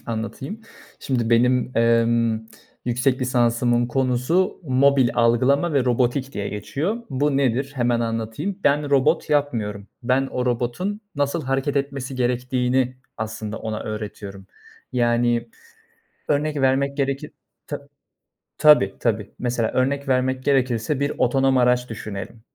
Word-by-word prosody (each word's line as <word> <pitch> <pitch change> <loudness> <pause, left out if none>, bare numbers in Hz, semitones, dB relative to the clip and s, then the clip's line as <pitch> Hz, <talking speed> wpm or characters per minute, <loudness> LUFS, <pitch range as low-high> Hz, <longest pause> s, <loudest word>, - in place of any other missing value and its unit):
Anlatayım. 115 - -5 0.4
Şimdi 120 -4 -1
benim, 125 +1 +2
emm, 115 -1 +3 0.4
yüksek 125 +2 +1
lisansımın 120 -1 +2
konusu 130 +8 0
mobil 135 -1 +4
algılama 130 +7 +3
ve 135 -3 +2
robotik 125 +2 0
diye 100 0 -3
geçiyor. 145 - -2
Bu 140 +1 +1
nedir 135 +1 0
hemen 120 -2 +1
anlatayım. 115 - -3
Ben 145 0 +2
robot 150 +4 +2
yapmıyorum. 110 -9 -1 0.2
Ben 130 +2 +1
o 125 -1 -3
robotun 125 - -1
nasıl 145 +3 -1
hareket 135 +2 -1
etmesi 135 -1 -2
gerektiğini 125 0 0 0.2
aslında 110 0 -5
ona 110 -1 -4
öğretiyorum. 105 -2 -7 0.5
Yani, 120 -1 +1 0.8
örnek 150 +1 0
vermek 135 +1 +2
gerekir 140 -1 -2 0.4
Tab - - -5 0.8
Tabii, 145 -11 +6
tabii. 110 -3 -1
Mesela, 120 -2 -1
örnek 140 +2 0
vermek 130 0 +1
gerekirse 130 -1 +1
bir 140 +1 0
otonom 135 +1 +2
araç 125 0 +2
düşünelim. 105 0 -7
125 Hz, 120 wpm, -22 LUFS, 115-140 Hz, 0.8 s, Tabii